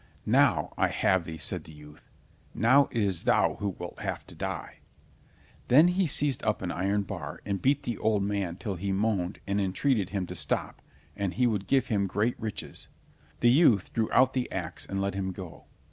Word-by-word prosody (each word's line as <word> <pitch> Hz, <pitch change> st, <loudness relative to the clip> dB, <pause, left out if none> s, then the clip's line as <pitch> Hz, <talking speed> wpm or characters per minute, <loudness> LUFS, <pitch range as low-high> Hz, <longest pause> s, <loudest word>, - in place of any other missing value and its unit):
"Now -, -, +3 dB
I -, -, +4 dB
have 95 Hz, -2 st, +1 dB
thee," 80 Hz, -1 st, -6 dB
said -, -, -1 dB
the -, -, -12 dB
youth. 75 Hz, 0 st, -15 dB, 0.5 s
"Now 130 Hz, +6 st, +5 dB
it 115 Hz, -3 st, 0 dB
is 95 Hz, -4 st, -1 dB
thou -, -, +3 dB
who 100 Hz, -3 st, -2 dB
wilt 90 Hz, -, -8 dB
have -, -, -4 dB
to -, -, -12 dB
die." -, -, -5 dB, 0.9 s
Then 150 Hz, +8 st, +6 dB
he 180 Hz, 0 st, +1 dB
seized 140 Hz, -3 st, 0 dB
an 105 Hz, -5 st, -1 dB
iron 100 Hz, +3 st, 0 dB
bar -, -, -6 dB
and 100 Hz, -2 st, -2 dB
beat 140 Hz, +2 st, +2 dB
the 120 Hz, -3 st, -3 dB
old 105 Hz, -2 st, +1 dB
man 100 Hz, -4 st, -2 dB
till 95 Hz, 0 st, -5 dB
he 100 Hz, +3 st, -2 dB
moaned 95 Hz, -2 st, -1 dB
and 100 Hz, +1 st, 0 dB
entreated 100 Hz, +1 st, 0 dB
him 95 Hz, -2 st, -2 dB
to -, -, -8 dB
stop, -, -, -2 dB, 0.3 s
and 100 Hz, -3 st, -2 dB
he 125 Hz, -, +2 dB
would 105 Hz, -5 st, 0 dB
give 135 Hz, -1 st, +3 dB
him 100 Hz, -4 st, +1 dB
great 105 Hz, +5 st, -1 dB
riches. 110 Hz, -3 st, -6 dB, 0.5 s
The 120 Hz, -, +6 dB
youth 125 Hz, -, +4 dB
drew 110 Hz, -1 st, 0 dB
out 130 Hz, 0 st, +4 dB
the 130 Hz, -1 st, -2 dB
ax 90 Hz, -4 st, -4 dB
and 95 Hz, -, -3 dB
let 100 Hz, 0 st, -1 dB
him 95 Hz, -1 st, -2 dB
go. 90 Hz, -3 st, -10 dB
100 Hz, 195 wpm, -28 LUFS, 95-120 Hz, 0.9 s, Then